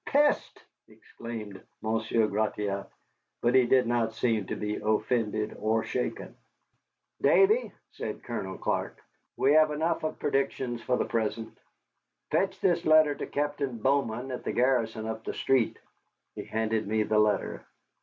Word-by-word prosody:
"Peste!" 290 +1 +2 0.2
exclaimed 110 -4 -9 0.2
Monsieur 110 0 +1
Gratiot, 105 -1 -2 0.5
but 120 +1 +3
he 130 -2 +5
did 130 +1 +4
not 115 -1 0
seem 110 -3 0
to - - -3
be 105 0 -3
offended 110 0 0
or 110 +1 +1
shaken. 125 +2 -4 0.9
"Davy," 430 +5 +4 0.2
said - - -6
Colonel - - -5
Clark, - - -2 0.4
"we 135 - +3
have 155 0 +6
had 150 - -3
enough 160 +2 0
of 155 - -2
predictions 135 -4 -1
fo 125 - 0
the - - 0
present. 110 0 -2 0.8
Fetch - - +1
this 175 -2 +2
letter 155 -2 +5
to - - -6
Captain 145 -3 -2
Bowman 130 0 0
at 125 - -5
the - - -3
garrison 120 -3 +1
up 110 0 -5
the - - -5
street." 130 -4 +1 0.6
He - - -7
handed 110 -1 -1
me 110 +1 +1
the 105 0 +2
letter. 105 -1 +1
115 Hz, 145 wpm, -28 LUFS, 110-135 Hz, 0.9 s, have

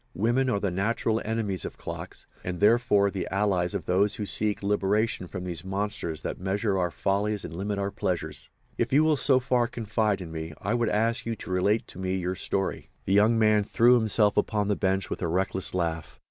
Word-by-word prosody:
Women 120 +6 +1
are 105 - +1
the 100 -2 -1
natural 110 +4 0
enemies 110 -4 -1
of - - -6
clocks, - - -7 0.2
and, 90 -1 -4
therefore, 105 -2 +4
the 95 - -3
allies 95 -2 0
of 90 - -3
those 100 +3 +2
who 105 - -4
would 100 - -4
seek 105 -1 0
liberation 105 0 0
from 90 0 -6
these 85 -2 -5
monsters 95 -5 -3
that - - -4
measure 100 +2 0
our 90 -2 +1
follies 100 +4 -1
and 80 - -7
limit 100 +3 -2
our 100 0 -1
pleasures. 85 -5 -3 0.3
If - - 0
you 145 +3 +5
will 155 -1 +3
so 135 -2 +3
far 125 -2 +1
confide 110 -3 -1
in 85 -3 -7
me 80 0 -5
I 100 +4 -1
would 120 -2 +1
ask 115 +2 0
you 115 - -1
to 95 - -9
relate 100 +4 +1
to - - -11
me 95 0 -1
your 90 0 -2
story." 95 0 -2 0.2
The 95 - +1
young 105 +3 +5
man 110 -1 +4
threw 120 +4 +4
himself 110 -2 +2
upon 105 -2 +1
the 105 - +2
bench 95 -1 0
with - - -4
a 85 - 0
reckless 95 +2 0
laugh. 80 -3 -3
100 Hz, 215 wpm, -27 LUFS, 95-110 Hz, 0.3 s, you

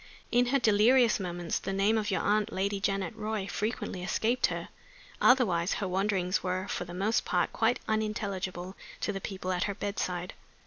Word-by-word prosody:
In 245 +1 +4
her 275 +3 +3
delirious 230 +1 +4
moments 175 -2 -2
the - - -4
name 195 +3 +2
of 215 -1 0
your 195 - +1
aunt, 210 0 +1
Lady 200 +1 -1
Janet 195 0 -1
Roy, 215 -2 -3
frequently 210 -3 -3
escaped 230 +7 +1
her. - - -5 0.5
Otherwise 195 -9 +4
her 200 - -2
wanderings 190 -1 0
were 185 +1 -2
for 180 - -3
the 175 - -9
most 210 +5 +1
part 180 -2 0
quite 230 +2 +2
unintelligible 200 -4 -2 0.3
to 205 - -1
the 195 - -5
people 185 -1 -4
at 180 -1 0
her 200 - -3
bedside. 185 -3 -3
200 Hz, 175 wpm, -30 LUFS, 185-220 Hz, 0.5 s, In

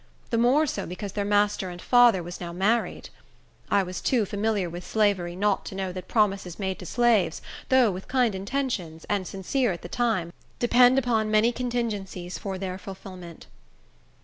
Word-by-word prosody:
The 230 - +2
more 260 +6 +4
so, 205 -9 -3
because 185 +3 -6
their 205 +1 -2
master 205 -2 +1
and 175 0 -8
father 240 -5 +5
was 175 +1 -8
now 170 -1 -5
married. 200 +7 0 0.6
I 200 - +3
was 180 0 -6
too 240 -5 +2
familiar 205 -1 -1
with 175 +1 -7
slavery 195 -5 +1
not 200 +1 +1
to - - -7
know 190 -1 -3
that 185 0 -7
promises 195 -5 0
made 190 -2 -3
to 180 - -8
slaves, 225 -8 +2 0.3
though 255 -5 +5
with 185 +1 -7
kind 250 -4 +2
intentions, 190 - -3
and 200 -3 0
sincere 220 +5 -1
at 175 - -6
the - - -6
time, 200 -8 0 0.2
depend 245 +1 +5
upon 230 -5 +1
many 215 +2 +4
contingencies 215 -7 -3
for 195 -2 -4
their 185 -1 -4
fulfillment. 185 -3 -10
200 Hz, 175 wpm, -26 LUFS, 185-235 Hz, 0.6 s, father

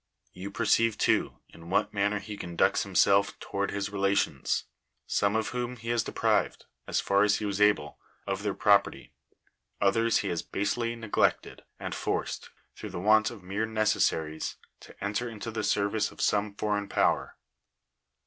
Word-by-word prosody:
You 95 +2 -7
perceive, 115 +2 +2
too, - - +1
in 85 0 -13
what 95 - +1
manner 100 +1 +1
he 105 +1 -7
conducts 85 -4 +1
himself 100 0 +3
toward 100 0 -2
his 100 0 -3
relations; 100 0 0 0.4
some 100 +1 +1
of 110 0 0
whom 125 0 -3
he 115 -1 -8
has 120 -1 +2
deprived, - - 0 0.2
as - - 0
far 100 0 +2
as 105 -1 +4
he 105 - -3
was 100 0 -2
able, 105 -8 +2 0.3
of - - -2
their - - -2
property; - - +2 0.7
others 115 +4 +3
he 100 - -1
has 85 - -1
basely 115 +4 -2
neglected, 115 -3 0 0.2
and - - -5
forced, - - -3 0.3
through 105 - -7
the 95 -2 -5
want 110 +3 +4
of 95 - -11
mere 100 +4 -2
necessaries 105 -8 0 0.2
to - - -13
enter 105 +4 -1
into 115 0 -6
the 110 -1 -3
ser 100 0 +2
vice 105 +1 -1
of - - -17
some 105 0 +1
foreign 105 -1 -1
power. - - +1
105 Hz, 165 wpm, -28 LUFS, 100-110 Hz, 0.7 s, as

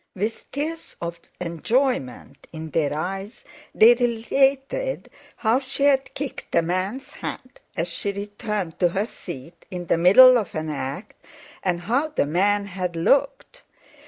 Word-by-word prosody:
With 215 +4 -3
tears 320 +3 -4
of 170 0 -5 0.2
enjoyment 180 - -1
in 160 -1 -7
their 150 -2 +1
eyes, 195 +7 -5 0.3
they 230 +2 +8
related 270 - 0 0.2
how 230 +2 +2
she 275 +1 -4
had 270 -2 +2
kicked 280 -1 -5
a 170 - +4
man's 185 +9 -3
hat 255 -1 -7 0.2
as 165 +1 0
she 190 +4 -2
returned 205 -3 -4
to 180 - +5
her 195 +4 -1
seat 170 - -10
in 180 -1 -5
the 165 - +1
middle 245 +8 +8
of 205 - -6
an 155 0 -2
act, 145 +8 -6 0.4
and 175 -2 -1
how 250 - +1
the 305 - 0
man 200 +6 +2
had 180 -3 -4
looked. 280 - +1
200 Hz, 145 wpm, -23 LUFS, 170-255 Hz, 0.4 s, they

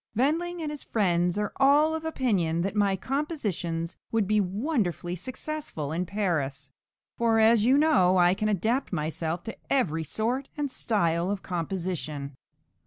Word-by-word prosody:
Wendling 330 +7 0
and 300 - -3
his 295 - -6
friends 180 -3 +1
are 210 -1 -2
all 290 +3 +5
of 320 0 -3
opinion 195 - 0
that 195 +3 -2
my 200 -2 +3
compositions 195 - -3
would 225 -4 +1
be 210 0 +3
wonderfully 195 - -1
successful 255 - -5
in 175 +3 -2
Paris; 150 -9 -2 0.5
for, 230 -1 +3
as 220 0 +5
you 260 +3 +5
know, 265 - +4
I 175 0 +5
can 215 +2 -1
adapt 220 +7 0
myself 160 +1 -2
to 225 - -6
every 165 - +1
sort 240 - -2
and 290 -2 -2
style 170 -7 0
of 200 -1 -3
composition." 165 -5 -3
200 Hz, 150 wpm, -27 LUFS, 170-260 Hz, 0.5 s, all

